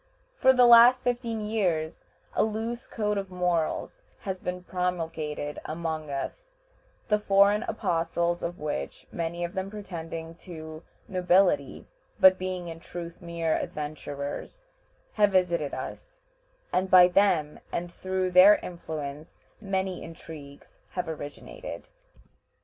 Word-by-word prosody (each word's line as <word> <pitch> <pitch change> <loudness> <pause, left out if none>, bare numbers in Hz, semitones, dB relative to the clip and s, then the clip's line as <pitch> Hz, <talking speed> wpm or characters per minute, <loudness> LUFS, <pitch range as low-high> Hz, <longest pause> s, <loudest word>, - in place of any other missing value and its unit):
For 260 - +5
the 250 -1 +6
last 240 +2 +8
fifteen 235 -2 -1
years 185 -8 -1 0.3
a - - +3
loose 225 +2 -3
code 210 -2 -1
of 195 -1 -6
morals 180 - -1 0.2
has 190 -2 -4
been 180 0 -4
promulgated 165 -5 -3
among 160 -1 -4
us, - - -5 0.6
the 210 -1 +3
foreign 200 +1 +4
apostles 170 -2 0
of 175 +1 -4
which 70 - -4
many 170 +1 -3
of 175 - -3
them 190 +1 -3
pretending 165 -5 -6
to 160 -3 -9 0.3
nobility, 180 -6 +2 0.3
but 190 -1 +7
being 185 -1 -3
in 165 -1 -7
truth 170 +1 -8
mere 170 -2 -1
adventurers 145 - -5 0.5
have 205 -2 +3
visited 170 -6 +2
us, - - -7 0.6
and 185 +1 +1
by 180 -1 +9
them 180 -5 +2
and 175 0 -3
through 185 0 -2
their 185 +3 +9
influence 155 -5 -7 0.2
many 190 -2 -2
intrigues 150 -4 -11
have 180 -2 -2
originated. 160 - -7
180 Hz, 120 wpm, -27 LUFS, 160-200 Hz, 0.6 s, by